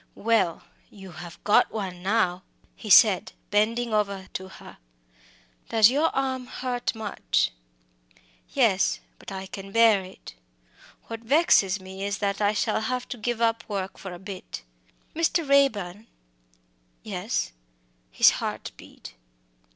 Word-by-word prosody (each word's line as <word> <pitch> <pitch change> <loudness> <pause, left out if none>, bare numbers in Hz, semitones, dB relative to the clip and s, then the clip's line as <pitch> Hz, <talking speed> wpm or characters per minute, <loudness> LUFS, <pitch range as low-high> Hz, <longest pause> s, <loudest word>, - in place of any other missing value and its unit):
"Well, 220 -6 +1 0.3
you 195 -2 -12
have 170 0 -10
got 205 - +4
one 190 -4 -5
now," 185 -2 +1 0.3
he 220 - -9
said, 200 -1 +6 0.2
bending 225 +3 +1
over 200 -3 -1
to 190 - -5
her. 190 - -14 0.9
"Does 220 0 +6
your 295 +5 +2
arm 260 -2 -1
hurt 250 -1 -3
you - - -10
much?" 210 -2 0 1.0
"Yes, - - +2 0.2
but - - -10
I 190 0 -5
can 195 +1 -9
bear 225 -2 +5
it. 185 - -12 0.7
What 230 -1 -6
vexes 230 - +3
me 190 +1 -8
is 200 +1 -2
that 200 0 -2
I 205 0 +3
shall 215 - 0
have 250 +3 -2
to - - -4
give 235 +1 -2
up 230 -1 +1
work 195 -2 -4
for 190 - -7
a 175 - -7
bit. 190 - -8 0.5
Mr. 330 -1 +1
Raeburn!" 225 -8 +2 1.0
"Yes." - - -3 0.6
His - - +6
heart - - -4
beat. - - -13
210 Hz, 135 wpm, -26 LUFS, 190-230 Hz, 1.0 s, said